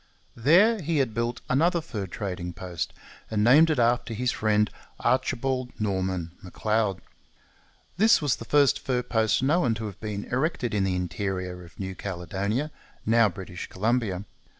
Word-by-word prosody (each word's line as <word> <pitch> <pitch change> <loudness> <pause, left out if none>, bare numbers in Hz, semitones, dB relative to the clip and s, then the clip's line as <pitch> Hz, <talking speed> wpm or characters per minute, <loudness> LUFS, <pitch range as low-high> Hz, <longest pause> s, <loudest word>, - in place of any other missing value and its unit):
There 185 - +5
he 165 0 0
had 130 -6 +1
built 115 +2 -2
another 170 +6 +3
fur 110 - -5
trading 90 -2 -5
post, 90 -2 -4 0.4
and 105 -1 +1
named 145 +8 +7
it 155 - +1
after 120 -1 +1
his 125 +3 0
friend, 105 -1 +2 0.3
Archibald 130 0 0
Norman 95 -4 -1
M'Leod. 105 +1 -1 1.0
This 220 +4 +6
was 145 -4 +1
the - - -7
first 145 -2 +4
fur 125 -2 -1
post 110 +1 +1
known 140 -5 +2
to 110 0 -5
have 100 -3 -7
been 105 -2 -4
erected 130 -3 -1
in 100 -2 +2
the 95 -1 0
interior 90 0 -3
of 85 - -16
New 95 -1 -4
Caledonia, 100 - -3 0.3
now 115 0 +5
British 90 -1 -7
Columbia. 105 -2 0
110 Hz, 150 wpm, -26 LUFS, 95-130 Hz, 1.0 s, named